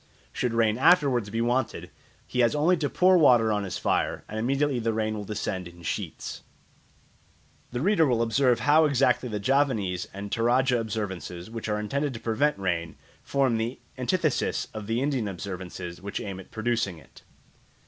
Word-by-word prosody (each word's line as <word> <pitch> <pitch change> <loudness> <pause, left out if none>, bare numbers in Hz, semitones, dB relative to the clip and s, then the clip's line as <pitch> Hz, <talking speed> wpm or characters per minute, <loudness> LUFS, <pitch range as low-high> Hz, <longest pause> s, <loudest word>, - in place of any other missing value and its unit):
Should 120 -2 -1
rain 110 0 +2
afterwards 135 - +4
be 115 +2 -2
wanted, 120 +1 -1 0.3
he 125 - -4
has 120 +3 +3
only 160 +5 +3
to 150 -3 -1
pour 185 0 +4
water 120 -7 +5
on 105 -1 0
his 95 - -4
fire, - - 0
and 110 - -5
immediately 135 +3 +1
the 115 -1 0
rain 110 0 -1
will 105 -1 -5
descend 100 -3 -3
in 85 0 -14
sheets. - - -4 1.3
The 125 0 -3
reader 180 -2 +3
will 120 -3 +2
observe 120 +1 +2
how 155 +2 +5
exactly 135 -3 +2
the 105 -2 -3
Javanese 105 -7 +1
and 100 +1 -7
Toradja 125 +2 +2
observances, 95 -4 -5
which 115 -1 -5
are 105 0 0
intended 140 +5 -2
to - - -6
prevent 120 +6 +1
rain, 85 -4 -2 0.3
form 135 -4 +1
the 115 +3 -2 0.2
antithesis 155 +3 0
of 110 -2 -6
the 115 +3 0
Indian 135 -6 0
observances, 90 -2 -6
which 100 +1 -4
aim 95 -2 -6
at 95 - -12
producing 110 -5 -1
it. 75 - -17
115 Hz, 170 wpm, -27 LUFS, 100-135 Hz, 1.3 s, water